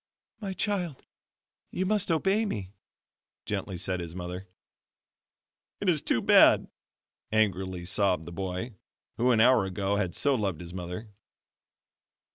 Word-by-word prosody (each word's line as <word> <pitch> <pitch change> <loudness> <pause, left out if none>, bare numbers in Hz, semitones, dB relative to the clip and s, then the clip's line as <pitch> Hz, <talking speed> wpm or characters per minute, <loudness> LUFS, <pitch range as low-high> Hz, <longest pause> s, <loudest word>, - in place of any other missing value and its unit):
"My 195 -4 -4
child, 185 -7 -2 0.6
you 185 - -2
must 210 -1 +1
obey 195 +6 +2
me," 100 - -4 0.7
gently 95 - -3
said 90 +1 -1
his 85 -1 -6
mother. 90 +1 -6 1.3
"It 200 - +1
is 155 -5 +2
too 115 - 0
bad," - - +6 0.6
angrily 95 -4 0
sobbed 95 -3 +2
the 85 - -8
boy, 95 +6 -4 0.4
who 125 +2 +2
an 115 -3 +4
hour 125 -1 +6
ago 95 +1 -1
had 95 -4 -1
so 145 - +2
loved 100 - -1
his 85 0 -8
mother. 90 +4 -6
100 Hz, 130 wpm, -28 LUFS, 90-145 Hz, 1.3 s, bad